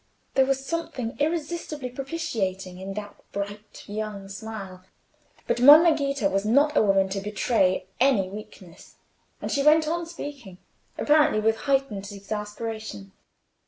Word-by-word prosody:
There 265 Hz, -1 st, +4 dB
was 270 Hz, 0 st, 0 dB
something 270 Hz, -7 st, -3 dB
irresistibly 305 Hz, -3 st, -2 dB
propitiating 210 Hz, -, -3 dB
in 195 Hz, +1 st, -6 dB
that 210 Hz, -1 st, -7 dB
bright 205 Hz, +1 st, -6 dB
young 205 Hz, -2 st, -5 dB
smile, 195 Hz, -2 st, -8 dB, 0.6 s
but -, -, 0 dB
Monna 305 Hz, +6 st, +9 dB
Ghita 275 Hz, -7 st, 0 dB
was 195 Hz, 0 st, 0 dB
not 285 Hz, +8 st, +3 dB
a -, -, +5 dB
woman 195 Hz, -2 st, +3 dB
to 195 Hz, +1 st, -2 dB
betray 205 Hz, -2 st, +1 dB
any 250 Hz, -7 st, +3 dB
weakness, 190 Hz, -3 st, -12 dB, 0.5 s
and -, -, -3 dB
she 280 Hz, -, +1 dB
went 305 Hz, +2 st, +5 dB
on 335 Hz, +1 st, -2 dB
speaking, 280 Hz, -, -8 dB, 0.4 s
apparently 300 Hz, -6 st, +4 dB
with 220 Hz, +1 st, +2 dB
heightened 225 Hz, -8 st, 0 dB
exasperation. 210 Hz, -, -6 dB
220 Hz, 130 wpm, -25 LUFS, 195-280 Hz, 0.6 s, Monna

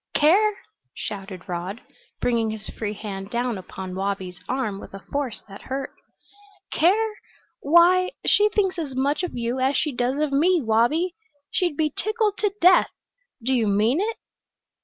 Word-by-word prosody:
"Care!" 400 Hz, +7 st, +4 dB, 0.4 s
shouted 195 Hz, -3 st, -6 dB
Rod, 180 Hz, +4 st, -4 dB, 0.4 s
bringing 230 Hz, -2 st, +1 dB
his 215 Hz, -1 st, -6 dB
free 210 Hz, -2 st, -4 dB
hand 195 Hz, -2 st, -6 dB
down 240 Hz, -2 st, -1 dB
upon 185 Hz, 0 st, -7 dB
Wabi's 190 Hz, -1 st, -3 dB
arm 240 Hz, -6 st, -1 dB
with -, -, -10 dB
a 195 Hz, -, -11 dB
force 280 Hz, -5 st, -2 dB
that 195 Hz, -1 st, -11 dB
hurt. 270 Hz, +1 st, -4 dB, 0.8 s
"Care! 425 Hz, +7 st, +3 dB, 0.5 s
Why, 350 Hz, +4 st, +5 dB, 0.2 s
she 420 Hz, 0 st, +5 dB
thinks 390 Hz, -4 st, 0 dB
as 285 Hz, -5 st, -4 dB
much 280 Hz, +4 st, +1 dB
of 360 Hz, -8 st, -4 dB
you 240 Hz, +2 st, -1 dB
as 265 Hz, +2 st, +2 dB
she 300 Hz, -, 0 dB
does 250 Hz, +2 st, -1 dB
of 305 Hz, -2 st, 0 dB
me, 340 Hz, +6 st, +4 dB
Wabi! 260 Hz, +9 st, +2 dB, 0.4 s
She'd 345 Hz, -5 st, 0 dB
be 305 Hz, -2 st, +1 dB
tickled 430 Hz, -1 st, 0 dB
to 415 Hz, -2 st, +1 dB
death! 360 Hz, +1 st, +6 dB, 0.5 s
Do 260 Hz, +3 st, +1 dB
you 235 Hz, -4 st, +2 dB
mean 215 Hz, -, +2 dB
it?" 445 Hz, +2 st, -2 dB
265 Hz, 160 wpm, -24 LUFS, 210-350 Hz, 0.8 s, death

